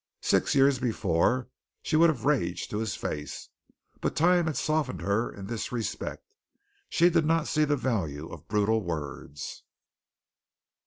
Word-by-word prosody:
Six - - +2
years 135 -1 +5
before 115 +1 +1 0.4
she - - 0
would 165 +2 +6
have 140 -7 -2
raged 120 -12 0
to 105 - -1
his 110 -1 -2
face, 75 0 -5 0.5
but - - -2
time 175 +1 +4
had 155 - -1
softened 155 -4 0
her 100 +4 0
in 100 - -9
this 115 +2 -4
respect. 120 -3 -4 0.6
She 175 +1 +4
did 165 -1 +3
not 165 +1 +2
see 155 -1 +2
the 145 0 +1
value 80 - -2
of 80 -3 -11
brutal 110 +1 +2
words. 75 -4 -6
120 Hz, 150 wpm, -28 LUFS, 95-150 Hz, 0.6 s, would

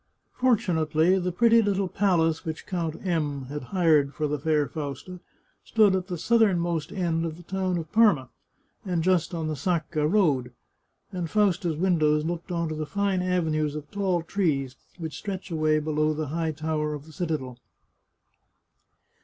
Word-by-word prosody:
Fortunately 180 -8 +2
the 180 0 -1
pretty 230 +5 +5
little 200 -2 0
palace 170 -5 +1
which 160 -1 -5
Count 165 -4 -2
M 150 -6 -1
had 145 -2 -5
hired 155 -5 +2
for 155 - -1
the 150 0 -2
fair 150 0 +1
Fausta 150 +6 -6 0.4
stood 210 -4 +4
at 185 -1 -2
the 180 -3 -4
southernmost 175 -6 +1
end 170 -3 -1
of 165 -1 -4
the 175 - -13
town 185 0 -1
of 160 -2 -6
Parma, 205 - +4 0.5
and 180 -4 -1
just 180 -1 +1
on 160 -2 -2
the 155 - -2
Sacca 155 0 -1
road, 140 - +2 0.6
and 180 -4 -4
Fausta's 190 -5 +1
windows 155 -4 +2
looked 175 +2 -4
on 170 -1 -1
to 155 - -3
the 155 0 -4
fine 200 -1 0
avenues 160 -5 0
of 150 -1 -7
tall 190 -4 0
trees 150 -9 -1 0.2
which 160 -3 -6
stretch 195 -2 -6
away 155 -1 +2
below 155 0 0
the 155 -2 -3
high 160 +1 -1
tower 155 0 -2
of 145 0 -9
the 160 - -14
citadel. 150 -7 -4
165 Hz, 160 wpm, -26 LUFS, 155-185 Hz, 0.6 s, pretty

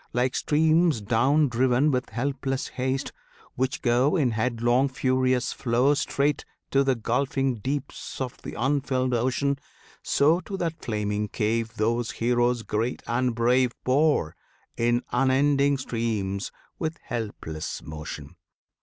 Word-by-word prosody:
Like 125 +1 +1
streams 160 -1 +3
down 130 +8 +3
driven 130 +4 +2
With 125 -1 -1
helpless 135 +3 -2
haste, 130 +1 -2 0.4
which 130 +4 -2
go 125 +5 +3
In 140 -8 +2
headlong 120 +3 +1
furious 130 -1 +1
flow 125 +3 +2
Straight 145 0 0 0.3
to 140 0 +4
the 135 -1 +2
gulfing 130 +2 0
deeps 135 +4 -4
of 130 -2 -3
th' - - -8
unfilled 130 0 0
ocean, 130 +3 0 0.4
So 155 +5 +3
to 195 +1 -6
that 165 -3 -3
flaming 105 -2 -1
cave 115 +2 -1
Those 115 +2 0
heroes 120 0 +1
great 115 +4 -2
and 120 0 0
brave 125 +1 +3
Pour, 135 - +2 0.4
in 120 +1 +1
unending 140 +2 +3
streams, 110 -6 -2 0.3
with 160 0 -2
helpless 105 -9 -5
motion! 75 0 -8
125 Hz, 125 wpm, -26 LUFS, 115-140 Hz, 0.4 s, to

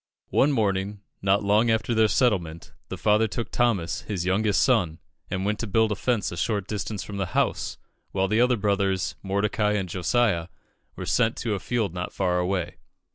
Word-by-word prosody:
One 145 - +4
morning, 100 -4 0 0.2
not 100 +1 +2
long 105 +3 +3
after 110 +1 +1
their 110 -1 +4
settlement, 95 -8 0 0.2
the - - -5
father 105 +1 +3
took 115 +2 -5
Thomas, 110 -9 0
his 95 -5 -4
youngest 100 +2 +2
son, 100 -11 +2 0.3
and 95 +1 -2
went 105 +1 -1
to 115 - -3
build 110 +2 +2
a - - 0
fence 120 -4 0
a 85 - -6
short 100 +2 -1
distance 105 -1 -4
from 100 - -7
the 95 -2 -1
house, - - 0 0.3
while 95 0 +1
the 110 +4 +2
other 125 0 +3
brothers, 100 -2 0
Mordecai 105 +2 0
and 100 -3 -1
Josiah, 90 -1 +1 0.5
were - - -6
sent 115 -2 +1
to 115 -3 -2
a 100 - -2
field 110 -6 -1
not 90 0 -4
far 90 -2 +1
away. 90 -1 -2
100 Hz, 185 wpm, -25 LUFS, 95-110 Hz, 0.5 s, One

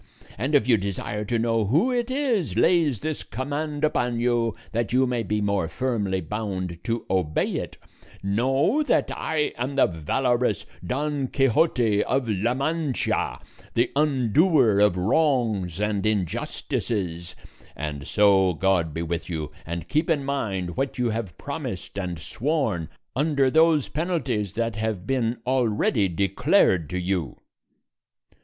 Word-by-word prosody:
And 130 +8 -1
if 130 -5 +3
you 120 -3 +5
desire 100 +2 -3
to 115 +3 0
know 115 -1 +1
who 160 - +2
it 240 -1 0
is 245 - 0
lays 155 - +3
this 155 -1 -3
command 145 +4 -4
upon 125 -6 +1
you, 120 -2 +1 0.2
that 115 0 -1
you 130 +2 +4
may 125 -2 -1
be 105 0 -1
more 100 -4 0
firmly 100 0 -1
bound 95 -2 -4
to 115 0 -2
obey 90 -5 0
it, - - -5 0.5
know 135 - +2
that 300 - +1
I 155 -2 -1
am 130 +3 -2
the 140 - +5
valorous 120 - 0 0.2
Don 145 +1 -1
Quixote 125 -5 +2
of 130 -2 0
La 110 +3 0
Mancha, 150 0 -1 0.4
the 120 +1 +2
undoer 140 - +3
of 105 -3 +3
wrongs 110 - +1
and 105 -1 0
injustices; 95 -2 -2 0.4
and 70 -2 -5
so 95 -3 +4
God 85 -3 +1
be 85 - -2
with 85 +1 -3
you, 80 -3 -4 0.2
and 85 -1 -4
keep 155 +3 0
in 145 -4 +1
mind 95 -11 -2
what 135 0 -1
you 120 -2 +1
have 110 -6 -4
promised - - -5
and 90 -3 -3
sworn 110 - -1 0.3
under 140 -1 +2
those 160 -2 +4
penalties 140 - -2
that 115 -1 -1
have 110 -4 -2
been 120 -1 0
already 115 -5 +2
declared 90 -3 +2
to 90 - -2
you." 90 -6 -2
115 Hz, 140 wpm, -25 LUFS, 95-140 Hz, 0.5 s, you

